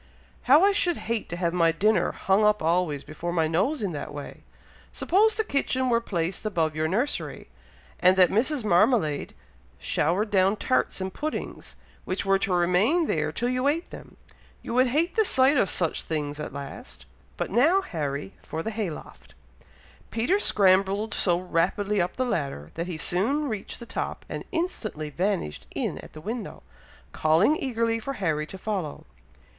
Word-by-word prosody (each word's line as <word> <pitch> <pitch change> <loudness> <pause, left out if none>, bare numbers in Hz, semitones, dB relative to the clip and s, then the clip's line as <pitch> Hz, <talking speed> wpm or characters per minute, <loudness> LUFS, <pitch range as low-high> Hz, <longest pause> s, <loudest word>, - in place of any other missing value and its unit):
"How 295 +6 +8
I 400 - +6
should 355 -4 +2
hate 230 -1 -3
to 175 - -4
have 175 -1 -1
my 165 -2 +3
dinner 190 +2 +2
hung 195 +2 +1
up 210 -3 +3
always 165 -4 +1
before 170 +3 -5
my 165 -2 +1
nose 205 - 0
in 195 - -1
that 145 -1 -6
way! 145 -1 -8 0.5
Suppose 430 +4 +2
the 440 - +1
kitchen 260 -7 0
were 235 -1 +3
placed 180 -4 -2
above 165 -7 0
your 155 0 0
nursery, 235 - -2 0.5
and 185 +1 +5
that 185 -1 +6
Mrs. 255 +5 +1
Marmalade 180 - +2 0.4
showered 170 - 0
down 195 +1 +3
tarts 130 -1 0
and 190 0 -3
puddings, 310 +1 -5 0.3
which 185 +1 -3
were 195 0 +3
to 195 - -1
remain 180 - +3
there 155 - 0
till 240 +10 -1
you 255 +2 0
ate 325 +4 -1
them, - - -11 0.5
you - - -5
would 255 +1 +4
hate 310 +8 +1
the 440 - +4
sight 265 -6 +4
of 200 - +2
such 165 -3 0
things 150 -2 -3
at 150 - -5
last. 140 - -8 0.3
But - - -3
now, 310 - +4
Harry, 140 - -4
for 160 +1 -5
the 225 - -3
hay 215 -4 -2
loft." 155 - -11 0.7
Peter 290 - +1
scrambled 195 - +3
so 175 -3 +2
rapidly 185 +3 0
up 175 - -2
the 255 - 0
ladder, 140 - -3
that 170 +2 -4
he 175 -3 -4
soon 230 - 0
reached 215 -6 -5
the 235 - -8
top, - - -4
and - - -6
instantly 225 - -3
vanished 180 - -2
in - - -2
at - - -12
the 155 - -10
window, 225 +5 -6 0.5
calling 165 - +3
eagerly 230 -5 -1
for 275 +5 -4
Harry 155 - -1
to 190 - -8
follow. 190 -7 -4
195 Hz, 175 wpm, -26 LUFS, 165-245 Hz, 0.7 s, How